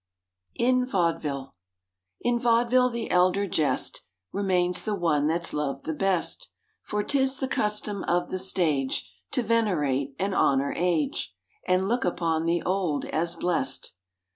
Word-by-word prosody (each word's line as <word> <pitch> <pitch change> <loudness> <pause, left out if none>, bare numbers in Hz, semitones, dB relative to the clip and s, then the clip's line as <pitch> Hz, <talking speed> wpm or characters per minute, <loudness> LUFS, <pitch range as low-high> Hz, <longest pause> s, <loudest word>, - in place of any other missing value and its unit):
IN 255 +1 +3
VAUDEVILLE 160 - -1 0.7
In 240 0 +1
vaudeville 245 +2 +3
the 235 -2 -4
elder 185 +3 +3
jest 155 -6 0 0.3
Remains 180 -2 +1
the 215 -2 -1
one 155 -6 +1
that's 170 +1 +1
loved 140 -2 -3
the 160 - -2
best; 190 +1 0 0.3
For 210 0 -2
'tis 265 0 +1
the 265 - -2
custom 210 -4 0
of 175 +1 +1
the 185 - -2
stage 150 - 0 0.3
To 250 - +1
venerate 150 - +1
and 195 +1 -1
honor 140 -5 +2
age 150 - -1 0.3
And 185 +1 +2
look 240 +3 0
upon 165 -2 0
the 170 0 +1
old 180 -6 0
as 170 +2 -1
blest. 175 0 -1
180 Hz, 140 wpm, -26 LUFS, 160-210 Hz, 0.7 s, IN